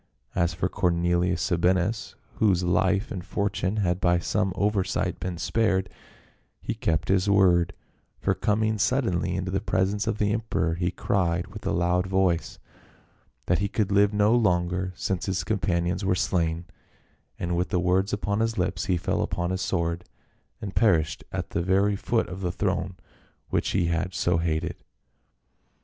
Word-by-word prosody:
As 85 Hz, -2 st, +1 dB
for 85 Hz, -, 0 dB
Cornelius 85 Hz, 0 st, +1 dB
Sabinus, 90 Hz, +4 st, 0 dB, 0.2 s
whose 95 Hz, -5 st, +3 dB
life 95 Hz, +4 st, +1 dB
and 90 Hz, -3 st, -4 dB
fortune 100 Hz, 0 st, -1 dB
had 90 Hz, -3 st, 0 dB
by 85 Hz, 0 st, +3 dB
some 95 Hz, +3 st, 0 dB
oversight 100 Hz, -1 st, 0 dB
been 90 Hz, -1 st, -4 dB
spared, 95 Hz, -2 st, 0 dB, 0.7 s
he -, -, -3 dB
kept 80 Hz, -3 st, -1 dB
his 95 Hz, +1 st, +2 dB
word, 90 Hz, -3 st, +4 dB, 0.5 s
for -, -, +1 dB
coming 110 Hz, +1 st, 0 dB
suddenly 95 Hz, -8 st, +1 dB
into 95 Hz, 0 st, -2 dB
the 95 Hz, 0 st, 0 dB
presence 100 Hz, 0 st, 0 dB
of 105 Hz, -, 0 dB
the 105 Hz, 0 st, +1 dB
emperor, 110 Hz, -7 st, -1 dB
he 85 Hz, +1 st, -1 dB
cried 90 Hz, -1 st, 0 dB
with 105 Hz, +1 st, -8 dB
a -, -, +1 dB
loud 90 Hz, +1 st, +1 dB
voice, 95 Hz, -4 st, +1 dB, 0.5 s
' -, -, -38 dB
that 85 Hz, -, +2 dB
he 100 Hz, -, 0 dB
could 100 Hz, 0 st, -1 dB
live 100 Hz, +1 st, +4 dB
no 105 Hz, +1 st, +3 dB
longer 90 Hz, -4 st, +1 dB
since 95 Hz, +2 st, -2 dB
his 95 Hz, -1 st, -1 dB
companions 90 Hz, -2 st, 0 dB
were 95 Hz, -1 st, +2 dB
slain,' 85 Hz, -2 st, 0 dB, 0.7 s
and 85 Hz, 0 st, -2 dB
with 90 Hz, +2 st, 0 dB
the 90 Hz, -, +1 dB
words 95 Hz, +2 st, +1 dB
upon 100 Hz, 0 st, -1 dB
his 115 Hz, 0 st, 0 dB
lips, 90 Hz, -1 st, -1 dB
he 90 Hz, -3 st, +1 dB
fell -, -, -1 dB
upon 85 Hz, 0 st, -1 dB
his 95 Hz, +1 st, -2 dB
sword 85 Hz, -2 st, -1 dB, 0.6 s
and 100 Hz, -2 st, -6 dB
perished 85 Hz, -8 st, +2 dB
at -, -, -4 dB
the -, -, 0 dB
very 100 Hz, +3 st, +2 dB
foot 115 Hz, +3 st, 0 dB
of 95 Hz, +1 st, -7 dB
the 90 Hz, -2 st, -1 dB
throne 95 Hz, -1 st, -1 dB, 0.5 s
which -, -, 0 dB
he 90 Hz, -3 st, +1 dB
had 85 Hz, +2 st, -1 dB
so 85 Hz, -1 st, +1 dB
hated. 85 Hz, +1 st, -1 dB
95 Hz, 165 wpm, -26 LUFS, 85-100 Hz, 0.7 s, word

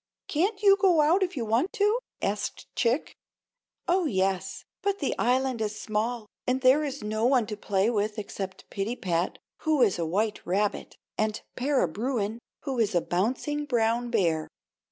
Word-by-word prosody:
"Can't 390 Hz, +7 st, 0 dB
you 395 Hz, -1 st, +7 dB
go 365 Hz, -5 st, +4 dB
out 330 Hz, +6 st, +4 dB
if 365 Hz, -4 st, -1 dB
you 235 Hz, -, -1 dB
want 235 Hz, -, +1 dB
to?" 425 Hz, +1 st, +2 dB, 0.2 s
asked -, -, -2 dB
Chick. 245 Hz, +4 st, +1 dB, 0.7 s
"Oh, 360 Hz, 0 st, +3 dB
yes; 190 Hz, -3 st, -1 dB, 0.2 s
but 400 Hz, 0 st, 0 dB
the 280 Hz, -, -1 dB
island 255 Hz, 0 st, +1 dB
is 215 Hz, 0 st, -2 dB
small, 220 Hz, +2 st, -2 dB, 0.2 s
and 255 Hz, +1 st, +1 dB
there 265 Hz, +4 st, +5 dB
is 280 Hz, -3 st, -4 dB
no 215 Hz, +1 st, -2 dB
one 255 Hz, -3 st, +3 dB
to 210 Hz, -, -5 dB
play 200 Hz, -1 st, +1 dB
with 215 Hz, -1 st, 0 dB
except 195 Hz, -2 st, -6 dB
Pittypat, 195 Hz, -5 st, -1 dB, 0.2 s
who 310 Hz, -5 st, +3 dB
is 200 Hz, -6 st, +2 dB
a 165 Hz, -, 0 dB
white 210 Hz, +5 st, 0 dB
rabbit, 200 Hz, +4 st, -1 dB, 0.2 s
and 215 Hz, 0 st, 0 dB
Para 265 Hz, -5 st, +2 dB
Bruin, 220 Hz, +3 st, -2 dB, 0.2 s
who 270 Hz, -4 st, -3 dB
is 210 Hz, -4 st, +1 dB
a 175 Hz, -, +4 dB
bouncing 260 Hz, -, -1 dB
brown 240 Hz, -2 st, +1 dB
bear." 170 Hz, -9 st, +1 dB
230 Hz, 165 wpm, -27 LUFS, 205-290 Hz, 0.7 s, you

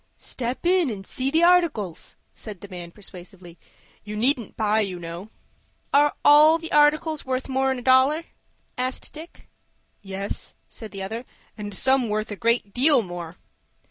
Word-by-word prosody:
"Step 250 Hz, +5 st, -4 dB
in 355 Hz, -4 st, +3 dB
and 195 Hz, -4 st, -6 dB
see 260 Hz, +5 st, -2 dB
the 320 Hz, +4 st, +2 dB
articles," 335 Hz, -, +2 dB, 0.2 s
said 210 Hz, -5 st, -9 dB
the 200 Hz, -, -9 dB
man, 175 Hz, -2 st, -8 dB
persuasively. 180 Hz, -2 st, -12 dB, 0.4 s
"You 210 Hz, 0 st, -7 dB
needn't 240 Hz, 0 st, 0 dB
buy, 215 Hz, 0 st, +2 dB
you 195 Hz, -4 st, -2 dB
know." 170 Hz, +4 st, -8 dB, 0.6 s
"Are 290 Hz, +1 st, +4 dB
all 305 Hz, +2 st, +7 dB
the 330 Hz, 0 st, -8 dB
articles 300 Hz, +1 st, +3 dB
worth 260 Hz, 0 st, -3 dB
more'n 265 Hz, 0 st, 0 dB
a 245 Hz, -, -8 dB
dollar?" 265 Hz, +5 st, +4 dB, 0.6 s
asked 255 Hz, +1 st, -2 dB
Dick. 320 Hz, +3 st, -12 dB, 0.5 s
"Yes," 195 Hz, 0 st, -5 dB
said 220 Hz, -, -9 dB
the 195 Hz, -2 st, -7 dB
other, 225 Hz, +5 st, -5 dB, 0.3 s
"and 205 Hz, -2 st, -6 dB
some 265 Hz, +1 st, +3 dB
worth 215 Hz, +1 st, -2 dB
a -, -, -3 dB
great 230 Hz, -2 st, 0 dB
deal 265 Hz, -1 st, +4 dB
more." 175 Hz, -2 st, -7 dB
235 Hz, 155 wpm, -24 LUFS, 200-285 Hz, 0.6 s, all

